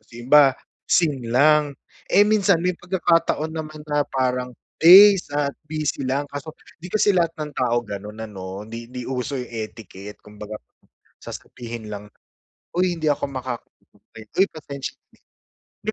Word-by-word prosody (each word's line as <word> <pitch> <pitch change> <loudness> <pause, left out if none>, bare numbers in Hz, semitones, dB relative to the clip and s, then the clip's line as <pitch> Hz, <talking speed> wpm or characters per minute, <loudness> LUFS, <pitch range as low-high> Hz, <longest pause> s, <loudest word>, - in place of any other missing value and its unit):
iba, 135 +3 +5 0.3
seen 145 -8 +1
lang, 145 +3 +4 0.3
eh 205 - +6
minsan 200 -5 +3
may 180 0 +1
pagkakataon 165 -3 0
naman 155 -1 -6
na 145 -2 0
parang 125 -2 -1 0.3
days 190 +3 +9
at 145 -1 0 0.2
busy 155 -4 -2
lang, 140 +2 0
kaso 145 +2 -7 0.3
'di 180 - -7
kasi 215 -1 +3
lahat 170 -2 +2
ng 150 -1 -5
tao 120 -2 +1
ganon 105 +1 -7
ano, 95 -2 -7
di 115 +1 -8
di 125 0 -6
uso 130 +1 -3
yung 125 -1 -6
etiquette, 110 -3 -8
kumbaga 105 0 -9 0.6
sasabihin 115 -3 -8
lang, 105 0 -7 0.7
"Uy 180 -1 +2
hindi 155 -2 -1
ako 145 - 0
makaka-attend, 120 -3 -9
uy 195 - +6
pasensya 140 -3 -7 0.7
na." - - -7
140 Hz, 140 wpm, -22 LUFS, 115-160 Hz, 0.7 s, days